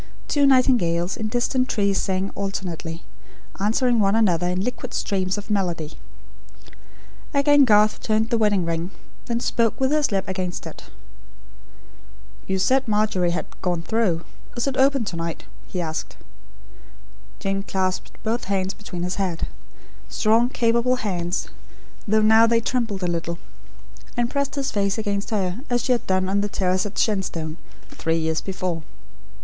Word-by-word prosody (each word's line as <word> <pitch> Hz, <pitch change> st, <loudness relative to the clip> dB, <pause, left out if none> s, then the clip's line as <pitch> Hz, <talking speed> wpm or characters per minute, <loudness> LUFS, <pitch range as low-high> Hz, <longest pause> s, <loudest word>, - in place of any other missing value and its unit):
Two 285 Hz, -1 st, +3 dB
nightingales, 205 Hz, -10 st, +3 dB
in 220 Hz, -2 st, -3 dB
distant 250 Hz, +3 st, 0 dB
trees, 200 Hz, -2 st, +1 dB
sang 190 Hz, 0 st, -1 dB
alternately; 180 Hz, -4 st, -4 dB, 0.6 s
answering 230 Hz, +4 st, +2 dB
one 200 Hz, 0 st, +3 dB
another 180 Hz, -6 st, +3 dB
in 180 Hz, +1 st, 0 dB
liquid 250 Hz, +2 st, -4 dB
streams 190 Hz, -1 st, 0 dB
of 205 Hz, +1 st, -6 dB
melody. 175 Hz, -6 st, -1 dB, 1.4 s
Again 285 Hz, 0 st, +6 dB
Garth 210 Hz, -2 st, +4 dB
turned 220 Hz, +1 st, +1 dB
the 235 Hz, -, +3 dB
wedding 205 Hz, -5 st, +2 dB
ring; 165 Hz, +1 st, -2 dB, 0.4 s
then 235 Hz, -1 st, 0 dB
spoke, 230 Hz, -2 st, +1 dB
with 265 Hz, +1 st, +2 dB
his 300 Hz, -4 st, +2 dB
lips 195 Hz, -1 st, 0 dB
against 185 Hz, -2 st, -3 dB
it. -, -, -9 dB, 1.6 s
"You 190 Hz, -, 0 dB
said 260 Hz, +7 st, +2 dB
Margery 210 Hz, -4 st, +2 dB
had 170 Hz, -, -1 dB, 0.2 s
'gone 175 Hz, -3 st, -1 dB
through.' 190 Hz, -6 st, +1 dB, 0.3 s
Is 240 Hz, -, 0 dB
it 275 Hz, -2 st, -1 dB
open 270 Hz, -2 st, +3 dB
to 185 Hz, -, -4 dB
night?" 165 Hz, -1 st, -4 dB, 0.2 s
he 185 Hz, -, -4 dB
asked. 160 Hz, -2 st, -4 dB, 1.2 s
Jane 195 Hz, 0 st, -1 dB
clasped 190 Hz, -1 st, -2 dB
both 230 Hz, +2 st, -1 dB
hands 190 Hz, -1 st, 0 dB
behind 180 Hz, -4 st, -6 dB
his 180 Hz, +1 st, -2 dB
head 175 Hz, -4 st, -1 dB, 0.6 s
strong, 225 Hz, +3 st, +3 dB
capable 235 Hz, +1 st, +2 dB
hands, 180 Hz, -7 st, -2 dB, 0.6 s
though 215 Hz, +1 st, +3 dB
now 220 Hz, +1 st, +7 dB
they 230 Hz, 0 st, +4 dB
trembled 230 Hz, -5 st, -1 dB
a -, -, +1 dB
little 170 Hz, 0 st, -2 dB, 0.8 s
and 240 Hz, 0 st, +1 dB
pressed 280 Hz, 0 st, -1 dB
his 275 Hz, -2 st, -1 dB
face 200 Hz, 0 st, 0 dB
against 205 Hz, -2 st, -2 dB
her, 195 Hz, -2 st, -1 dB
as 240 Hz, -1 st, +1 dB
she -, -, 0 dB
had 245 Hz, -, +1 dB
done 185 Hz, 0 st, +1 dB
on 200 Hz, +1 st, +1 dB
the 205 Hz, -, -1 dB
terrace 185 Hz, 0 st, 0 dB
at 205 Hz, -, -10 dB
Shenstone, 175 Hz, -7 st, -1 dB, 0.3 s
three 165 Hz, 0 st, -1 dB
years 160 Hz, -1 st, 0 dB
before. 185 Hz, -3 st, -3 dB
200 Hz, 155 wpm, -23 LUFS, 180-230 Hz, 1.6 s, now